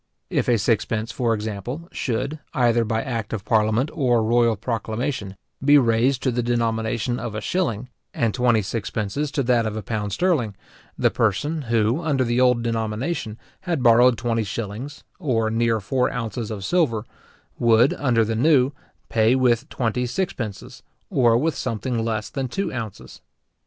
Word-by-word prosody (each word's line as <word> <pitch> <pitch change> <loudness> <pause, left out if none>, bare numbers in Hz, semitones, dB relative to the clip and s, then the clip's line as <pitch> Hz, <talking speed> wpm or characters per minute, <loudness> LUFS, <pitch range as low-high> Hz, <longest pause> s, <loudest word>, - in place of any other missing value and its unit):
If - - 0
a 120 - +4
sixpence, 110 +1 0
for 120 -3 0
example, 110 +9 -5
should, 140 +5 -2 0.2
either 120 -3 +3
by 110 0 -1
act 115 -5 -4
of 105 -3 -4
parliament 110 +5 +2
or 120 -6 +2
royal 115 0 +3
proclamation, 110 -1 -3 0.3
be 145 +1 +7
raised 125 +1 +2
to 130 - +2
the 120 +1 0
denomination 115 0 -1
of 115 -2 -5
a - - -2
shilling, 125 - -1 0.2
and 115 -3 0
twenty 120 -4 +2
sixpences 110 +6 -3
to 140 - 0
that 120 -2 +2
of 110 - -4
a 110 - -5
pound 105 0 -3
sterling; 120 - 0 0.4
the - - +2
person 155 +2 0
who, 115 +5 +2
under 145 -5 +1
the 120 +1 +1
old 125 -2 +3
denomination, 115 +2 -2 0.3
had 160 -7 0
borrowed 120 0 +6
twenty 115 -1 0
shillings, 115 +7 -6 0.2
or 115 -9 0
near 115 0 +1
four 125 +5 0
ounces 115 -1 -4
of 100 -3 -5
silver, 135 -12 +1 0.5
would, 120 +2 +4
under 120 -5 +2
the 110 +1 -2
new, 135 +1 +4 0.4
pay 115 +2 +3
with 125 +1 +2
twenty 125 +1 -1
sixpences, 120 - -4 0.3
or 120 -3 +4
with 155 +5 +1
something 115 +1 -2
less 110 -2 -2
than 135 -2 -2
two 195 +6 -3
ounces. 110 -5 -7
115 Hz, 160 wpm, -23 LUFS, 110-130 Hz, 0.5 s, be